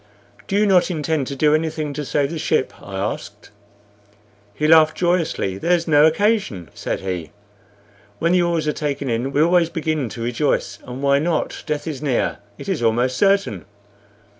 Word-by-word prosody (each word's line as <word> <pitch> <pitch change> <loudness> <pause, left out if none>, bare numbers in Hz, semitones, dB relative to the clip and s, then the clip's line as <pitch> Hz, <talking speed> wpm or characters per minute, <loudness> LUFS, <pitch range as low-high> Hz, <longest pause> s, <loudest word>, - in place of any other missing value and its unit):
"Do 195 - -2
you 210 - +4
not 190 -3 +4
intend 155 -4 -1
to 140 - -4
do 150 +2 +3
anything 155 -1 -1
to 150 - -4
save 140 +1 0
the 165 - -4
ship?" - - 0
I 100 - -9
asked. 100 +2 -5 1.0
He 150 - 0
laughed 155 -1 +5
joyously. 165 - 0
"There's 170 - +1
no 150 -1 +6
occasion," 195 - 0
said - - -4
he. 90 -5 -4 0.9
"When 165 +7 +1
the 180 0 +4
oars 170 -3 0
are 150 - +1
taken 140 -3 -3
in 120 +4 -1
we 145 +2 +3
always 170 0 +3
begin 155 -6 -2
to 115 - -6
rejoice. 115 -4 -1
And 125 +2 -7
why 140 0 +4
not? 160 +1 -1
Death 150 -1 -2
is 150 -4 -5
near 135 -7 0 0.2
it - - -9
is 190 -8 -1
almost 120 +3 +1
certain. 195 - +1
150 Hz, 175 wpm, -21 LUFS, 125-170 Hz, 1.0 s, no